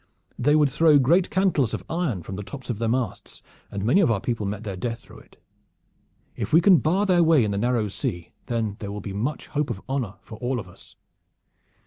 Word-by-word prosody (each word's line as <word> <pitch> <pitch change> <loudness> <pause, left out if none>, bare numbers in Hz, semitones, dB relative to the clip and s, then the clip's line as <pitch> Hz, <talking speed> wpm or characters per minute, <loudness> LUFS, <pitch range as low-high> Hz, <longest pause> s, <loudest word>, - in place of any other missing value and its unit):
They 145 +4 +3
would 150 -3 +3
throw 155 +1 +5
great 170 +8 +3
cantles 175 - +1
of - - -7
iron 155 - -2
from 95 - -7
the 100 - -5
tops 130 +5 -7
of 110 - -5
the 115 -1 0
masts, 125 0 -3 0.3
and 100 0 -4
many 170 - +4
of 175 - +3
our 110 -4 +1
people 110 -1 -2
met 105 +2 -4
their 100 -3 -5
death 115 +4 -4
through - - -15
it. - - -21 1.0
If - - -4
we 160 - +7
can 180 0 +6
bar 185 +6 +1
their 180 -3 +4
way 160 -6 +5
in 105 - -1
the 100 - -1
Narrow 120 -1 +1
Sea, 85 -3 -4 0.2
then 110 -4 -2
there 100 -1 -5
will 105 - -5
be 100 0 -6
much 120 +10 -3
hope 150 -1 -1
of 95 - -4
honor 130 -7 -2
for 110 -2 -11
all 125 +1 -1
of 95 - -8
us." 90 - -17
120 Hz, 225 wpm, -24 LUFS, 105-155 Hz, 1.0 s, we